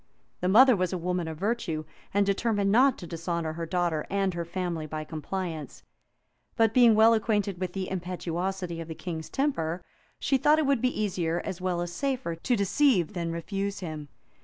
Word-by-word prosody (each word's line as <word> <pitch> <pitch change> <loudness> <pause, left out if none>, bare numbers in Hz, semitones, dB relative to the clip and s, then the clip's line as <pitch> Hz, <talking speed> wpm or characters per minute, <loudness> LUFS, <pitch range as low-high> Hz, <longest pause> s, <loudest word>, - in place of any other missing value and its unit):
The 180 - 0
mother 250 +5 +7
was 185 -2 0
a 185 - -1
woman 180 0 -2
of 160 -1 -5
virtue, 180 -6 -2 0.3
and 200 0 +3
determined 200 0 +1
not 255 +4 +5
to 175 - -8
dishonor 165 -1 -3
her 165 0 -5
daughter 170 -3 0
and 195 -1 0
her 170 0 -3
family 170 -2 -3
by 155 0 -4
compliance; 160 -1 -5 0.7
but 225 -1 +3
being 240 -3 +6
well 220 +1 +7
acquainted 205 -4 0
with 185 -1 -3
the 190 -1 -3
impetuosity 180 -1 -3
of 165 - -7
the 160 - -6
king's 160 -3 -6
temper, 175 - -1 0.3
she 270 - +1
thought 300 +3 +5
it 315 - +2
would 275 -4 +2
be 255 -2 0
easier, 175 -5 0
as 180 -1 -5
well 180 -2 -1
as 175 0 -4
safer, 265 -9 -2
to 205 +10 0
deceive 200 - +2
than 170 -3 -2
refuse 195 +4 -3
him. 155 -4 -6
185 Hz, 185 wpm, -28 LUFS, 170-215 Hz, 0.7 s, mother